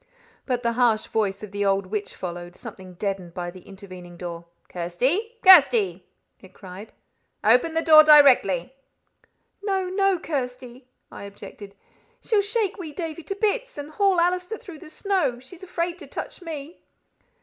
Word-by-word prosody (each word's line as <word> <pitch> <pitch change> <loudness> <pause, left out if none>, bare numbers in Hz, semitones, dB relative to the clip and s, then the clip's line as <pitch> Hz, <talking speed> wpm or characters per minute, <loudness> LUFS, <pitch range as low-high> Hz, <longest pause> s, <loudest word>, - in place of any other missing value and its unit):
But 250 -2 -2
the 235 - +1
harsh 230 -3 +2
voice 205 -2 -2
of 210 - -8
the 205 0 -2
old 195 -1 +1
witch 205 +1 -5
followed, 175 -1 -7
something 185 -1 -11
deadened 190 -2 -4
by 175 -1 -5
the 185 0 -13
intervening 185 -3 -12
door. 170 -1 -7 0.2
"Kirsty! 260 - -1
Kirsty!" 380 - +6 0.3
it - - -18
cried; 195 +2 -11 0.5
"open 250 +9 +3
the 325 - +1
door 310 -1 +8
directly." 265 - +5 0.9
"No, 385 -2 -1
no, 390 0 +1
Kirsty!" 255 -5 -6 0.2
I - - -9
objected. 200 0 -12 0.4
"She'll 430 -3 +1
shake 420 -1 -2
wee 325 -4 -7
Davie 330 -1 -6
to 390 - -6
bits, - - -2
and 290 +1 -7
haul 390 0 +2
Allister 360 +4 0
through 370 -10 -12
the 335 - -12
snow. 320 - -1
She's 295 +8 -13
afraid 350 -1 -4
to - - -11
touch - - -7
me." 320 -1 -8
270 Hz, 155 wpm, -24 LUFS, -, 0.9 s, door